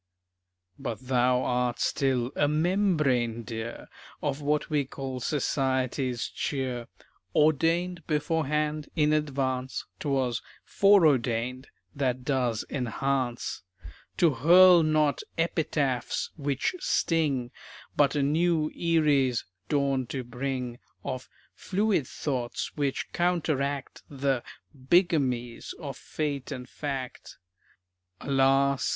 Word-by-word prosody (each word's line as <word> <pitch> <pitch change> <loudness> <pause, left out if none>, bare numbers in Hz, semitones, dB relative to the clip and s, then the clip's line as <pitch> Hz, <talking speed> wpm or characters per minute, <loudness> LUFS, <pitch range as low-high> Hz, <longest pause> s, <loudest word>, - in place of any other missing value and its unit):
But 115 -2 -4
thou 125 -1 +2
art 125 -1 0
still 130 -3 +1
a 145 - +2
"membrane" 150 - +1
dear 115 0 -6 0.4
Of 140 - -1
what 150 +1 0
we 150 -3 +1
call 135 -1 -6
society's 130 -2 0
cheer; 130 -4 -3 0.5
"Ordained 165 +4 +2
beforehand, 150 -1 0
in 150 0 +3
advance." 135 -3 -1
('Twas 135 -5 0 0.2
"foreordained," 130 - +3 0.3
that 130 -2 -1
does 125 -5 0
enhance,) 130 -1 -2 0.6
To 170 -3 +5
hurl 175 +7 +7
not 155 -2 +2 0.2
"epitaphs" 150 -6 0
which 145 - -1
sting, 145 - +1 0.4
But 145 0 +3
a 145 - +2
new 155 +1 +2
"Erie's" 150 -7 +2 0.2
dawn 140 -3 +1
to 130 0 -4
bring, 125 0 -4 0.2
Of 130 -2 -5 0.2
"fluid" 195 - 0
thoughts 125 -5 -3
which 140 -3 -1
counteract 155 -6 -1
The 135 -2 0 0.3
"bigamies" 130 -5 +1
of 140 -5 -6
fate 140 +1 -4
and 125 -1 -6
fact. 135 -4 -6 0.8
Alas! 135 -1 +2
140 Hz, 95 wpm, -28 LUFS, 125-155 Hz, 0.8 s, hurl